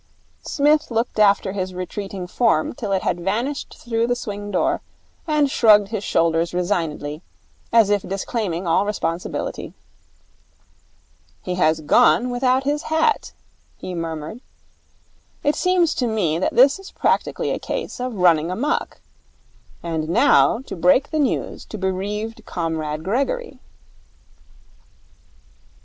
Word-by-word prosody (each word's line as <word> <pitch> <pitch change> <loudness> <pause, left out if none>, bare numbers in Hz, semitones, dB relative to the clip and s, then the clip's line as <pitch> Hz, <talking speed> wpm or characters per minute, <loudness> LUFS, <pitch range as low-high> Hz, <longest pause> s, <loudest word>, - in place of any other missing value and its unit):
Psmith 300 +1 +2
looked 230 -1 -1
after 200 -2 +4
his 185 -2 -4
retreating 190 +1 -5
form 180 -4 +1
till 215 -4 -5
it 190 -1 0
had 175 - 0
vanished 230 +10 -2
through 230 -1 -1
the 245 - +1
swing 205 -3 -6
door, 325 - 0 0.5
and 300 -3 +2
shrugged 210 -5 +5
his 215 -2 -3
shoulders 165 0 +1
resignedly, 165 -5 -2 0.5
as 225 -3 +5
if 205 -1 +2
disclaiming 190 -2 -3
all 170 +3 +3
responsibility. 180 -4 -3 1.7
'He 180 - -3
has 160 -3 +2
gone 245 +9 +4
without 255 +1 +1
his 295 +2 0
hat,' 320 +8 0 0.4
he 185 - -7
murmured. 165 +5 -5 1.0
'It 290 - +3
seems 365 -3 +2
to 250 - -1
me 180 -8 0
that 185 - -1
this 275 +8 +5
is 390 - -11
practically - - 0
a - - -2
case - - -5
of 250 -2 -3
running 170 -4 +3
amok. 260 - -2 0.8
And 160 -2 -3
now 235 +3 +4
to 265 - -8
break 185 +11 +3
the 310 - 0
news 280 -4 -1
to 215 - -7
bereaved 210 +4 -3
Comrade 160 -2 -3
Gregory.' 275 - -2
205 Hz, 130 wpm, -21 LUFS, 175-250 Hz, 1.7 s, shrugged